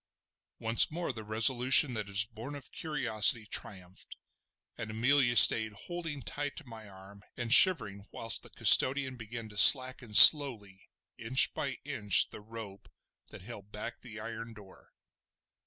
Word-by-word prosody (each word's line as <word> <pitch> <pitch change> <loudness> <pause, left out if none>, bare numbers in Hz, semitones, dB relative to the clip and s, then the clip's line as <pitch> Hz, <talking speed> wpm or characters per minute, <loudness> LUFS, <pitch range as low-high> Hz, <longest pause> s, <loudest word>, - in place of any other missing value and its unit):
Once 115 +1 -3
more 170 -3 -8
the 110 -2 -12
resolution 125 +5 +2
that 105 -3 -9
is 100 +1 0
born 115 +6 -13
of 140 -1 -14
curiosity 120 - -1
triumphed, 95 -3 -11 0.6
and 110 - -11
Amelia 120 +3 -3
stayed 110 -1 +5
holding 165 -6 -10
tight 145 +2 -8
to - - -11
my 110 -3 -16
arm 95 +1 -19 0.2
and 120 -1 -3
shivering 110 - +1
whilst 115 - -6
the - - -18
custodian 130 -1 +1
began 115 0 -12
to 105 -1 -7
slacken 130 -4 +4
slowly 110 -10 +4 0.3
inch 120 +4 0
by 135 -2 -8
inch 115 -9 -2
the - - -15
rope 105 -2 -15 0.4
that - - -15
held 105 -2 -14
back 105 +3 -11
the 110 -3 -12
iron 115 +1 -12
door. 100 -3 -21
115 Hz, 145 wpm, -26 LUFS, 105-130 Hz, 0.6 s, stayed